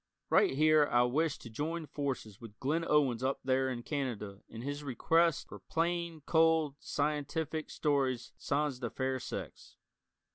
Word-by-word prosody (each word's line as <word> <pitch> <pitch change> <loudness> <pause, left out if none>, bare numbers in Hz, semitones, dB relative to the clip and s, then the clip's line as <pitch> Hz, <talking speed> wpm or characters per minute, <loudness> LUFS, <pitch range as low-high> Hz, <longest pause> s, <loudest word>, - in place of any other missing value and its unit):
Right - - +4
here 155 0 +5
I 120 0 +5
wish 145 +5 +1
to 115 - -10
join 160 +7 -3
forces 135 -8 -4
with 110 -3 -11
Glyn 155 +5 0
Owens 135 -6 +3
up 135 +1 0
there 130 0 +2
in 120 -2 -4
Canada 115 -9 -3
in 115 +1 -8
his 145 +2 -4
request 165 +4 +2
for 105 - -10
plain, 165 - -2
cold 160 -3 +3
scientific 150 +1 -2
stories 130 -5 0
sans 145 -2 -1
the 120 -2 -3
fair 130 +1 -1
sex. - - -7
140 Hz, 150 wpm, -33 LUFS, 125-155 Hz, -, here